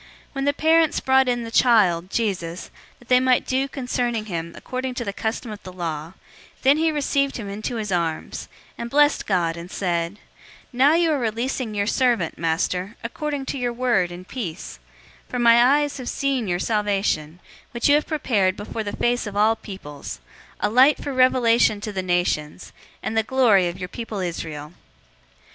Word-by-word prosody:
When 275 -1 -2
the 285 - +4
parents 320 +2 +3
brought 265 0 +3
in 240 -1 0
the 230 - -7
child, 195 -9 +3
Jesus, 185 -6 -3 0.3
that 245 - -21
they 250 0 +5
might 255 -1 +2
do 265 +1 0
concerning 245 -4 -2
him 170 -4 -4
according 255 0 -4
to 240 - -3
the 200 - -3
custom 220 +2 -3
of 210 - -8
the 185 - -9
law, 165 -2 -5 0.4
002:028 - - -30
then 275 +3 +5
he 320 0 +2
received 280 -2 0
him 220 -4 -6
into 210 +4 -4
his 215 -3 -3
arms, 165 -3 -2 0.3
and 235 - -4
blessed 290 +2 +3
God, 175 -4 +1
and 170 +1 -8
said, 170 -2 -1
002:029 - - -20 0.6
"Now 275 +5 +5
you 335 -1 +3
are 295 - +1
releasing 235 0 -2
your 200 0 0
servant, 235 -7 +1
Master, 180 +5 -1
according 285 +4 -4
to 275 - -4
your 245 -1 -1
word, 235 -8 +1
in 180 +1 -9
peace; 190 -7 -6 0.5
002:030 - - -34
for - - 0
my 235 0 +6
eyes 290 +3 +2
have 255 -2 -5
seen 270 -5 -1
your 175 -1 0
salvation, 195 -6 -1 0.3
002:031 - - -35
which 235 - +1
you 285 - +5
have 300 +1 +2
prepared 205 -11 +1
before 220 +2 -5
the 205 - -5
face 240 -1 0
of 205 -1 -6
all 215 +2 +4
peoples; 190 - -9 0.4
002:032 - - +4
a - - -3
light 260 +5 +5
for 280 - -3
revelation 240 -4 +4
to 210 0 -5
the 190 - -2
nations, 175 -3 -1 0.3
and 225 - -3
the 225 - +4
glory 220 -6 +3
of 175 +1 -5
your 180 -1 -5
people 225 +2 -6
Israel." 160 -4 -5
225 Hz, 195 wpm, -23 LUFS, 185-255 Hz, 0.6 s, my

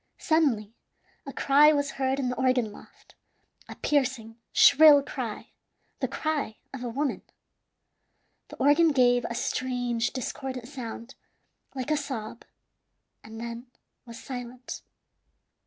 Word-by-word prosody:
Suddenly 260 -10 +1 0.5
a - - -4
cry 290 +2 +5
was 285 -2 0
heard 265 +1 +1
in 255 -2 -1
the 250 - -2
organ 255 -4 +1
loft - - -17 0.6
a - - -8
piercing, 250 -6 -1
shrill 290 -1 +7
cry, 245 -6 -6 0.5
the - - 0
cry 300 -8 -3 0.2
of 260 -2 -6
a 245 - -3
woman. 275 +4 -2 1.3
The - - -11
organ 295 +3 +4
gave 245 -2 +3
a 235 - -4
strange, 245 -1 -1
discordant 260 -1 -5
sound, 245 -2 -8 0.6
like 260 +2 -3
a 305 - +3
sob, 240 -6 -6 0.8
and 220 +1 -10
then 235 +1 -7 0.4
was 230 -1 -9
silent. 250 -1 -7
255 Hz, 125 wpm, -27 LUFS, 235-280 Hz, 1.3 s, shrill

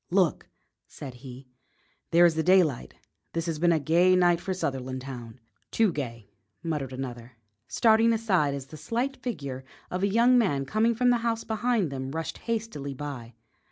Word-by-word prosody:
"Look!" 180 -3 +1 0.4
said 135 -4 -9
he; 130 +1 -11 0.6
"there 170 +1 +6
is 170 - +4
the 160 - 0
daylight! 175 -7 +2 0.4
This 165 0 -2
has 165 -3 -3
been 175 +1 +4
a 165 - +3
gay 175 +5 +4
night 175 -1 +3
for 190 - -4
Sutherlandtown." 130 -6 -5 0.3
"Too 225 -4 +2
gay," 115 -9 -6 0.3
muttered 150 -6 -3
another, 125 -2 -7 0.3
starting 225 0 +4
aside 185 -11 +1
as 135 -2 -6
the 155 +3 -11
slight 235 - -2
figure 140 - -5 0.3
of 180 - -2
a 200 - +3
young 235 +5 +4
man 145 -12 +1
coming 220 +9 +1
from 245 +2 +3
the 240 - +3
house 230 -1 -1
behind 220 - 0
them 130 -1 -4
rushed 165 0 -4
hastily 215 - -4
by. 130 -5 -7
165 Hz, 165 wpm, -27 LUFS, 135-215 Hz, 0.6 s, there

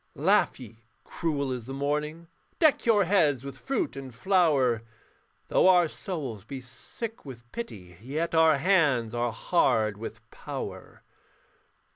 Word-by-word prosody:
Laugh - - +2
ye, 115 -3 -11 0.2
cruel 145 -5 -2
as 125 -2 -5
the 135 - -5
morning, 150 +4 -2 0.3
Deck 310 -6 +3
your 210 -3 +5
heads 160 - +2
with 140 0 -7
fruit 275 +3 -2
and 135 -3 -8
flower, 145 - +2 0.7
Though - - +4
our 175 -2 +5
souls 145 - -6
be 135 +4 -7
sick 215 - -8
with 120 -4 -11
pity, 95 - -7
Yet 155 +8 -3
our 160 -2 +5
hands 140 - +2
are 120 0 0
hard 110 - +1
with 115 - -8
power. - - -7
140 Hz, 135 wpm, -27 LUFS, 120-175 Hz, 0.7 s, your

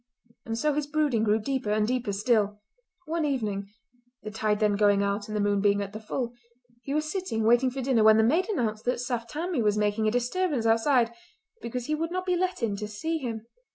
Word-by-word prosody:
And 225 0 -2
so 300 +4 +1
his 295 0 -2
brooding 295 -7 +1
grew 215 0 +3
deeper 260 0 -2
and 210 0 +2
deeper 250 -3 -1
still. 210 0 +1 0.5
One 325 +1 -1
evening—the 220 -1 -5
tide 215 -1 0
then 210 -2 +2
going 205 -1 +3
out 200 +1 -1
and 215 0 -3
the - - +1
moon 205 -1 +1
being 205 0 +3
at 200 0 -4
the 215 - -6
full—he 240 +2 -7
was 305 +2 0
sitting 360 - -2
waiting 240 +3 +4
for 265 +2 -5
dinner 245 -4 +3
when 220 0 +7
the 220 - +4
maid 325 - +2
announced 220 - -1
that 250 0 0
Saft 240 -2 -3
Tammie 325 -1 -2
was 210 -1 +2
making 210 +1 +1
a - - +2
disturbance 250 +2 0
outside 230 +1 +3 0.5
because 235 +1 -4
he 305 - -1
would 325 +2 -1
not 365 +1 -3
be 365 -1 +1
let 365 -6 -1
in 210 -3 0
to 210 +1 -4
see 320 +11 -3
him. 230 -5 -5
235 Hz, 215 wpm, -27 LUFS, 215-275 Hz, 0.5 s, when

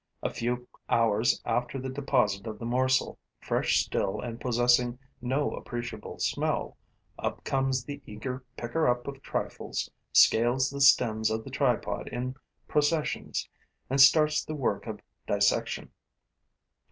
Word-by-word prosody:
A - - 0
few 125 +1 -2 0.2
hours 115 0 +2
after 125 +2 -1
the 130 - -4
deposit 125 -7 0
of 110 -1 -5
the 115 - -7
morsel, 130 +2 +1 0.2
fresh - - +1
still 95 - -1
and 120 -1 -6
possessing 120 0 +3 0.2
no 135 +4 0
appreciable 120 -3 -6
smell, - - -1 0.4
up - - -3
comes 135 -2 0
the 145 +2 -7
eager 125 +5 -5
picker 155 +7 0
up 120 +1 +1
of 140 -1 -6
trifles, - - -3 0.2
scales 120 +4 +4
the 140 0 -4
stems 110 -5 +5
of 110 0 -2
the - - -9
tripod - - 0
in 125 +1 -3 0.3
processions 150 +1 0 0.4
and 135 0 +4
starts 150 +2 +6
the 155 - -5
work 135 -3 -1
of 105 -2 -6 0.3
dissection. - - +1
125 Hz, 135 wpm, -28 LUFS, 115-135 Hz, 0.4 s, starts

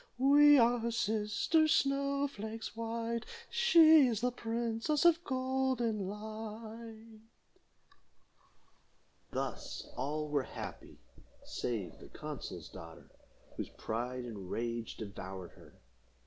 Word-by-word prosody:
We 290 +3 +7
are 240 0 +4
her 230 +1 -1
sisters, 225 +8 +2
snow 280 0 +2
flakes 220 -3 -6
white, 230 0 -2 0.3
She 325 - +7
is 225 -3 -1
the 250 +1 +1
princess 235 +6 -1
of 340 0 +5
golden 255 - 0
light." 220 +1 -8 2.1
Thus - - -4
all 150 +2 -2
were 145 -1 +1
happy, - - -8 0.5
save 100 -9 -4
the - - -13
consul's - - -7
daughter, 80 -1 -12 0.5
whose - - -4
pride 125 +3 -4
and 100 -6 -7
rage 115 +1 -3
devoured 95 -3 -7
her. - - -17
225 Hz, 105 wpm, -33 LUFS, -, 2.1 s, We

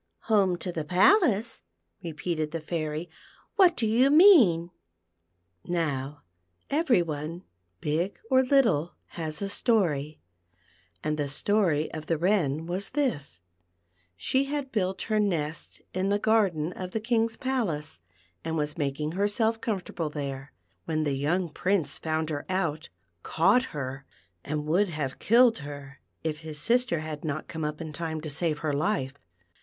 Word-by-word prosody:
'* - - -50
" - - -52
" - - -50
Home 190 -4 +4
to 180 - -3
the 165 -2 -3
palace 225 - +3 0.2
} 85 +1 -51
" 85 - -39
repeated 160 -1 -3
the 165 +2 -4
Fairy. 155 0 -3 0.5
"What 365 -4 +5
do 230 - 0
you 235 +5 +4
mean. 265 - +6 0.3
* 85 0 -50
" 85 +1 -47
Now 150 -5 -2 0.5
every 275 - +3
one, 160 +2 -5 0.4
big 165 +6 -1
or 260 0 +6
little, 225 - +2
has 160 +1 -4
a - - -1
story; 160 - +1 0.8
and 150 0 -1
the 145 - 0
story 160 0 +1
of 155 0 -6
the 165 - +1
Wren 165 -4 +1
was 185 +3 -2
this: 145 - -1 0.4
— 85 0 -42
She 265 - +1
had 280 -1 -3
built 190 -4 -1
her 215 -1 0
nest 165 -6 -2
in 185 +1 0
the 205 - +3
garden 195 -7 +1
of 185 -1 -7
the 220 - 0
King's 225 0 0
palace, 190 - -2 0.4
and 160 0 -2
was 150 +1 -2
making 150 +1 -1
herself 210 +4 0
comfortable 180 -6 -3
there, 140 -2 -5 0.3
when 155 -1 0
the 145 -2 0
young 160 +7 0
Prince 170 -2 -1
found 160 0 -1
her 145 -1 -3
out, 165 -5 -1 0.3
caught 195 - +3
her, 135 -2 -6 0.4
and 150 0 -3
would 180 +6 +2
have 150 -5 -4
killed 235 -1 +5
her, 145 -1 -9 0.2
if 155 -1 -2
his 155 -2 -7
sister 235 -2 +2
had 155 -1 -6
not 155 -1 -3
come 160 -1 -5
up 150 0 -3
in 160 -2 -6
time 160 -1 -3
to 155 -1 -4
save 155 0 -1
her 150 - +1
life. 145 -3 0
165 Hz, 165 wpm, -27 LUFS, 150-205 Hz, 0.8 s, mean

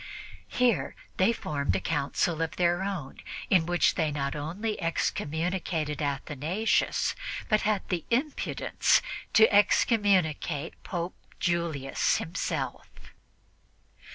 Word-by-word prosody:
Here 250 -2 +1 0.2
they 185 +5 +4
formed 140 - -1
a - - +1
council 155 - 0
of 165 - -2
their 175 0 +2
own, 190 -9 -4 0.3
in 175 -4 +4
which 175 0 +3
they 160 -3 0
not 140 -1 -2
only 190 +9 -3
excommunicated 160 -1 -1
Athanasius, 150 +8 0 0.4
but 215 -2 +3
had 210 -2 0
the 175 -4 -1
impudence 270 +6 +1 0.3
to 220 0 +8
"excommunicate" 190 - +2
Pope 175 -1 -4 0.3
Julius 165 -6 0
himself. 160 -5 -3
170 Hz, 100 wpm, -28 LUFS, 150-195 Hz, 0.4 s, to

